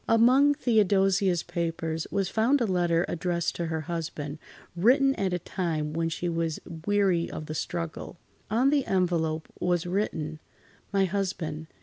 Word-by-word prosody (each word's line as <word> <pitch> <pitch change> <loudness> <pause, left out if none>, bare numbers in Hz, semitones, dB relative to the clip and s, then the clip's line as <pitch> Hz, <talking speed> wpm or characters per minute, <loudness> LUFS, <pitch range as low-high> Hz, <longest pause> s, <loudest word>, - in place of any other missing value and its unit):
Among 255 +6 +5
Theodosia's 195 - +2
papers 165 -1 -3
was 195 -2 0
found 230 +8 +2
a 240 - +2
letter 175 -3 +1
addressed 170 0 -1
to 170 - -2
her 160 -1 -2
husband, 155 -2 -5 0.4
written 265 +9 +4
at 195 -7 -1
a 180 - +1
time 160 -4 -3
when 165 +1 0
she 175 +2 -3
was 165 -2 -1 0.3
weary 195 -5 +2
of 155 - -6
the 155 - -5
struggle. 165 +2 -4 0.3
On 245 +6 +3
the 290 -2 +3
envelope 165 -4 0
was 175 -1 +1
written: 165 -5 -2 0.5
"My 195 -1 +3
Husband. 175 -5 -3
175 Hz, 145 wpm, -27 LUFS, 165-200 Hz, 0.5 s, Among